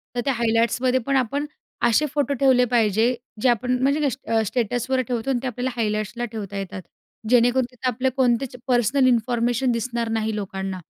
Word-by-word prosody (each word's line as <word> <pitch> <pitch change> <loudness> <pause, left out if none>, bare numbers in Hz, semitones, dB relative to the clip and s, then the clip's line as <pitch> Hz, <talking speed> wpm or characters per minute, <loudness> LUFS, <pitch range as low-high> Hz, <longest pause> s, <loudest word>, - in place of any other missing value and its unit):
तर 240 - 0
त्या 275 - +2
हायलाइट्समध्ये 235 +2 +1
पण 275 - 0
आपण 275 +4 -1 0.4
असे 240 +6 +4
फोटो 285 -1 0
ठेवले 260 -2 +4
पाहिजे, 225 +1 +2 0.3
जे 255 - +4
आपण 250 +2 +1
म्हणजे 285 +2 +2 0.2
अ, 225 -1 +3
स्टेटसवर 245 +4 -1
ठेवतो 245 +1 -2
आणि 255 -3 +1
ते - - -1
आपल्याला 250 0 -2
हायलाइट्सला 215 +1 -2
ठेवता 200 -3 -6
येतात, 195 -1 -5 0.5
जेणेकरून 245 +1 +4
तिथे 250 +1 -5
आपली 255 +2 0
कोणतीच 250 0 +1
पर्सनल 255 +2 +3
इन्फॉर्मेशन 240 +1 +1
दिसणार 235 0 -2
नाही 220 -1 -1
लोकांना 190 -2 -4
240 Hz, 165 wpm, -23 LUFS, 225-255 Hz, 0.5 s, असे